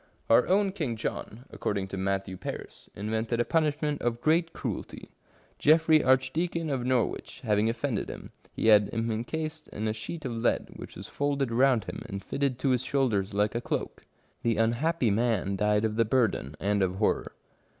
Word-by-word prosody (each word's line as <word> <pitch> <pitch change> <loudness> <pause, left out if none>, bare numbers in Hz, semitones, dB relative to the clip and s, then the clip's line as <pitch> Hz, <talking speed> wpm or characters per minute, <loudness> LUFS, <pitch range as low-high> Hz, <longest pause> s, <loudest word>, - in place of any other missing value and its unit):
Our 115 - +6
own 195 +1 +3
King 155 -11 -2
John, 110 +2 -5
according 100 -2 -2
to - - -5
Matthew 95 0 -1
Paris, - - -8
invented 110 +3 -2
a 120 - +2
punishment 150 -2 0
of 120 -1 -1
great 165 +3 +2
cruelty. - - -6 0.5
Geoffry, 155 0 +5
Archdeacon 150 +6 +1
of 130 -3 -1
Norwich, 125 -2 -1
having 105 -1 +2
offended 120 -1 -2
him, - - -8 0.2
he 110 - +1
had 105 -2 +6
him 115 0 -1
encased 155 +8 -4
in 110 +1 -4
a 110 - 0
sheet 150 +8 -6
of 125 - -2
lead, 115 +1 0
which - - -9
was - - -8
folded 140 -3 -1
round 125 -2 +3
him - - -7
and 100 0 -6
fitted 140 -3 -1
to 135 - 0
his 125 -2 +2
shoulders 110 -8 0
like 105 +1 +2
a 120 - -2
cloak. - - -4 0.3
The 115 -3 +1
unhappy 120 - +2
man 105 -3 +1
died 105 +2 +2
of 110 0 -2
the 115 - +5
burden 110 - 0
and 100 0 +1
of 95 -1 +1
horror. 105 +2 0
120 Hz, 180 wpm, -28 LUFS, 105-145 Hz, 0.5 s, Our